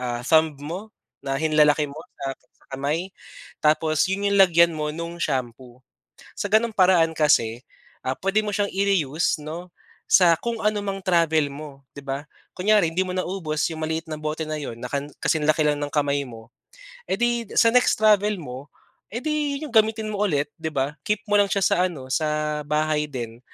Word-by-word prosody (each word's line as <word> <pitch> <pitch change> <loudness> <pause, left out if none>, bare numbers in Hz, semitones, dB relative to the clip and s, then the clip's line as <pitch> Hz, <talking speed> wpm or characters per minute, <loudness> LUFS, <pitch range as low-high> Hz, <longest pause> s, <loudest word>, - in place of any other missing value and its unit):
ah, 120 -1 -3
thumb 160 -1 +3
mo 185 +8 -6 0.3
na 135 0 -2
hinlalaki 150 -1 +3
mo 150 - -10 0.2
sa 135 0 -2 0.4
kamay 155 +7 -2 0.5
tapos 155 +2 +2
'yon 200 +1 0
yung 200 - +3
lagyan 170 -2 +6
mo 150 -1 -3
no'ng 170 +1 -6
shampoo. 125 -1 -4 0.6
Sa - - -3
gano'ng 225 +2 +4
paraan 180 -4 +4
kasi, 125 -6 +2 0.4
ah, 130 - 0
puwede 195 +3 +1
mo 205 - -2
siyang 205 -1 0
i-reuse 175 -6 0
'no 170 +4 -7 0.4
sa 170 -3 +6
kung 235 -1 -3
ano 210 -1 +1
mang 195 0 -3
travel 165 -4 +2
mo, 140 -1 -10 0.2
'di 140 - -8
ba. 140 +2 -4 0.3
Kunyari 195 -3 +3
'di 185 - +1
mo - - -6
naubos 175 -5 -2
'yong 160 - -7
maliit 160 +1 -2
ng 155 -1 -5
bote 155 +1 -3
na 155 0 -4
'yon 115 -4 -6
na - - -5
kan 140 0 -2 0.2
kasing 155 -2 +1
laki 155 0 +3
lang 145 0 +1
ng 145 - -2
kamay 145 -1 +1
mo. 115 0 -13 0.6
Eh, - - +1
di 240 -1 +1
sa 230 - +6
next 250 - +4
travel 210 -1 +4
mo 130 +2 -9 0.4
edi 290 +3 -2
'yong 280 -6 -7
gamitin 220 0 +3
mo 210 0 -1
ulit 145 -6 0
'di 160 -1 -4
ba. 140 +2 -1
Keep 210 0 -1
mo 205 - +2
lang 200 0 +4
siya 200 - +2
sa - - +3
ano 135 -7 -9
sa 150 0 -1
bahay 150 0 +1
din 120 -2 -6
160 Hz, 185 wpm, -23 LUFS, 145-195 Hz, 0.6 s, lagyan